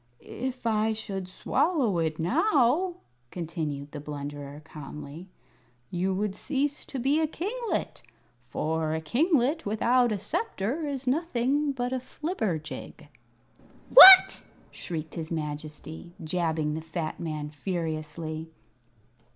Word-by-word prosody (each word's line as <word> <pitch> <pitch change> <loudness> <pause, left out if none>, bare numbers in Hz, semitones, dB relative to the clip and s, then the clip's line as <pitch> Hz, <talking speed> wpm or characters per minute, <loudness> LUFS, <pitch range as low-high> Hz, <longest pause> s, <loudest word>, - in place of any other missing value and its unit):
"If 255 0 -6
I 220 -1 +2
should 195 -4 -5
swallow 245 - 0
it 160 -1 -1
now," 305 - +2 0.3
continued 155 -4 -5
the 150 - -6
Blunderer, 145 0 -7
calmly, 150 +2 -9 0.6
"you 180 +2 0
would 195 +1 -1
cease 290 0 -2
to 275 - -7
be 275 +5 +2
a 315 - +2
kinglet; 440 +9 -3 0.5
for 160 0 -1
a - - -1
kinglet 285 - +1
without 235 +3 +2
a 210 - 0
sceptre 295 - -3
is 275 -2 -4
nothing 280 0 0
but 250 -1 -3
a 260 - -1
flibberjig." 225 - -5 0.8
"What!" 380 -6 +11 0.3
shrieked 160 -3 -6
his 165 -1 -6
Majesty, 155 +2 -6
jabbing 160 -2 -1
the 160 - -4
fat 160 0 -5
man 155 -3 -4
furiously. 155 0 -4
190 Hz, 115 wpm, -27 LUFS, -, 0.8 s, What